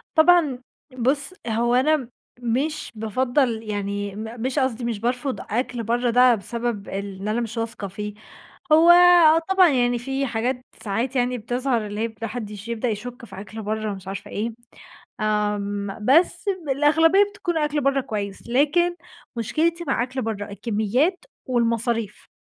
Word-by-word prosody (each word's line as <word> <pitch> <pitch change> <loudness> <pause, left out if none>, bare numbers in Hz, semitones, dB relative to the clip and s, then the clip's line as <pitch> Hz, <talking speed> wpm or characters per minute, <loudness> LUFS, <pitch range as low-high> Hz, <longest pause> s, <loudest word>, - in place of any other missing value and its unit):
طبعًا 315 -5 +5 0.4
بُصّ 280 +8 +1
هو 235 +1 +1
أنا 270 0 +2 0.3
مش 255 +6 -2
بافضّل 235 +2 0
يعني 205 -1 -3
م 225 +2 -7
مش 260 +4 -1
قصدي 260 -3 0
مش 230 -3 -2
بارفض 250 +3 -2
أكل 245 +2 -1
برّه 240 +2 0
ده 250 +1 +6
بسبب 230 0 -4
إن 195 0 -5
أنا 220 +3 0
مش 230 0 -4
واثقة 225 -3 -4
فيه، 210 +2 -6 0.6
هو 325 +2 +7
آه 345 -2 +7
طبعًا 380 -2 +6
يعني 245 -4 +2
في 270 +3 -2
حاجات 245 +2 -2 0.2
ساعات 235 +6 -2
يعني 250 0 +1
بتظهر 245 0 -1
اللي 210 +1 -5
هي 225 0 -2
ما 225 - -1
حدش 210 -2 -7
يبدأ 235 +1 -2
يشُكّ 235 +3 -5
في 195 - -10
أكل 220 +2 -8
برّه، 215 0 -2
مش 190 -1 -10
عارفة 200 +2 -6
إيه 220 +3 -2 0.7
آمم، 205 -2 -1
بس 320 +7 +4 0.3
الأغلبية 320 +7 +4
بتكون 350 -5 -2
أكل 300 -1 0
برّه 275 0 +2
كويّس، 205 -5 -5
لكن 305 +8 +2 0.4
مشكلتي 330 +9 0
مع 240 - +1
أكل 260 +1 -4
برّه 215 -2 -3
الكميّات 230 - 0 0.2
والمصاريف. 230 -3 0
240 Hz, 150 wpm, -23 LUFS, 215-275 Hz, 0.7 s, هو